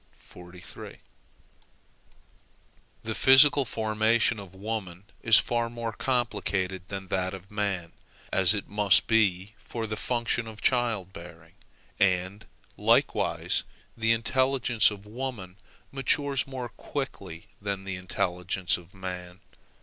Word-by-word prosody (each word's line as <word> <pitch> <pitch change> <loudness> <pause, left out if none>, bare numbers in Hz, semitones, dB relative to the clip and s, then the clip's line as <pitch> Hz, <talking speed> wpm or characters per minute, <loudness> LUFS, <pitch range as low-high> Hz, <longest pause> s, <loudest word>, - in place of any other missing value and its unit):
The 110 0 -3
physical 135 +3 +6
formation 110 +1 +1
of 95 -2 -11
woman 95 -3 -5 0.2
is 115 -1 +7
far 120 -1 +1
more 115 -1 -5
complicated 95 -6 -2
than 95 -2 -7
that 95 0 -1
of 95 +1 -13
man, 100 -5 -2 0.4
as 95 +2 +5
it 100 - -5
must 105 -2 +4
be 105 -3 +1
for 115 +4 -5
the 110 0 -4
function 120 0 -1
of 110 -1 -9
child 115 -6 0
bearing, 85 -1 -12 0.5
and 95 +2 0 0.3
likewise - - +2 0.3
the 115 0 +1
intelligence 125 0 +2
of 105 -1 -9
woman 105 -5 -6 0.3
matures 140 0 +1
more 130 -3 -6
quickly 100 - -6
than 100 -1 -3
the 95 -1 -4
intelligence 90 0 -2
of 90 +2 -16
man. 90 -1 -7
105 Hz, 110 wpm, -27 LUFS, 95-115 Hz, 0.5 s, is